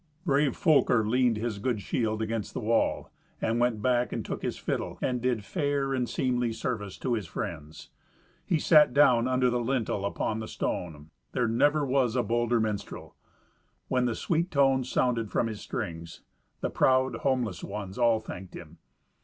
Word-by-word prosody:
Brave 140 -2 +2
Folker 140 - +3
leaned 125 -1 +2
his 110 -2 -3
good 120 0 -1
shield 110 +1 -1
against 110 -1 -4
the - - -1
wall, 115 +2 0 0.3
and 115 +1 0
went 120 -3 +1
back 125 -1 +2
and - - -4
took - - -4
his - - -3
fiddle, - - -3
and 125 -2 -1
did 120 -4 -1
fair 140 - -1
and 125 -2 -1
seemly 125 -2 0
service 110 -4 -4
to 125 - -1
his 105 -6 -2
friends. 80 -1 -6 0.5
He 170 - +1
sat 150 -3 +5
down 125 -4 +5
under 130 -1 +2
the 120 - 0
lintel 120 -5 -1
upon 105 +2 -2
the 110 - -5
stone. 80 -3 -4 0.2
There 120 -2 +1
never 145 +6 +2
was 130 -3 +1
a 125 - +2
bolder 120 0 +1
minstrel. 110 -2 -4 0.7
When 125 -1 +2
the 120 -2 0
sweet 170 +1 0
tones 135 -4 +2
sounded 115 -4 0
from - - +1
his 110 -2 -5
strings, 85 -5 -6 0.4
the - - -2
proud 130 -2 +2
homeless 120 -10 -1
ones 100 +1 -6
all 115 -2 +4
thanked 95 -4 -9
him. - - -11
120 Hz, 170 wpm, -28 LUFS, 110-130 Hz, 0.7 s, sat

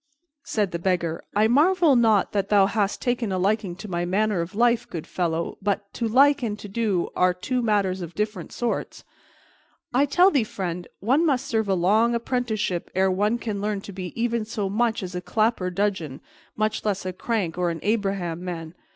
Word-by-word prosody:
Said 205 -4 -1
the 170 - -3
Beggar, 170 -2 -1
"I 215 +1 +4
marvel 315 +4 +4
not 225 -4 +3
that 200 -2 -1
thou 200 -2 +5
hast 205 -1 -1
taken 240 -4 0
a 185 - 0
liking 195 -1 0
to 210 - -9
my 175 -2 -2
manner 195 +1 +1
of 170 +3 -6
life, 235 +1 +2
good 165 -3 -5
fellow, 170 -2 -2
but 200 0 -2
'to 235 - -2
like' 280 +5 +5
and 215 -4 -2
'to 210 - -9
do' 200 -4 0
are 180 0 +3
two 250 +7 -2
matters 200 -5 +1
of 170 -1 -7
different 210 -4 -3
sorts. 240 -1 -3 0.9
I 275 +4 +3
tell 360 +7 +5
thee, 275 -6 +3
friend, 180 -4 -5
one 260 - +3
must 275 -6 +1
serve 220 -3 -1
a 190 - +3
long 215 +7 +3
apprenticeship 230 -7 -2
ere 190 0 +3
one 210 +5 +1
can 215 -4 -4
learn 210 -1 -1
to 200 - -9
be 185 -1 -6
even 235 -1 0
so 210 -2 -3
much 225 0 0
as 180 0 -6
a 180 - -3
clapper 215 -1 0
dudgeon, 180 -7 -2 0.4
much 215 0 -1
less 200 -3 -1
a 185 - -3
crank 190 -4 -2
or 180 -1 0
an 165 -1 -4
Abraham 195 -5 -1
man. 165 -3 -5
205 Hz, 195 wpm, -24 LUFS, 180-230 Hz, 0.9 s, thou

